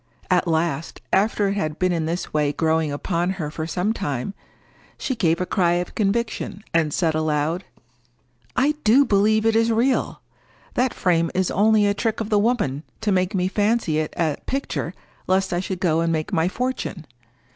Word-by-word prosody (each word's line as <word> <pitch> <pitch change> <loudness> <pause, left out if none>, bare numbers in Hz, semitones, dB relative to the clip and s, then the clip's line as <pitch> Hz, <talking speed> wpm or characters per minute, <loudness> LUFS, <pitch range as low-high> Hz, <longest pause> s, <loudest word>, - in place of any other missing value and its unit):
At 180 -1 +3
last, 160 -2 -1
after 205 0 +2
it - - 0
had 155 -6 -2
been 185 0 +1
in 165 -2 -1
this 170 +2 -3
way 150 -1 +2
growing 160 0 +1
upon 170 +4 -1
her 150 -5 -3
for 155 +1 -4
some 185 +6 0
time, 145 - -3 0.6
she 260 - -2
gave 170 -6 +1
a 180 - 0
cry 175 -2 +2
of 175 0 -2
conviction, 215 -1 -1
and 160 -2 +2
said 165 0 +1
aloud,— 155 +3 0 0.9
"I 280 +4 +3
do 255 +6 +5
believe 215 0 +3
it 225 0 +3
is 230 +1 +3
real! 245 +4 +1 0.5
That 250 0 +1
frame 170 -2 +2
is 185 -1 +1
only 210 +2 +4
a 200 - +3
trick 225 +1 -1
of 220 -1 -4
the 210 - +4
woman 205 - 0 0.2
to 215 -2 +1
make 185 +1 +1
me 185 -1 +1
fancy 205 -5 +1
it 155 - -3
a 155 -4 +1
picture 275 +1 -3 0.3
lest 190 0 +1
I 175 - +1
should 185 0 -4
go 165 -3 +2
and 165 0 +1
make 160 +5 -2
my 165 -1 +2
fortune. 235 -6 -3
185 Hz, 185 wpm, -23 LUFS, 160-215 Hz, 0.9 s, do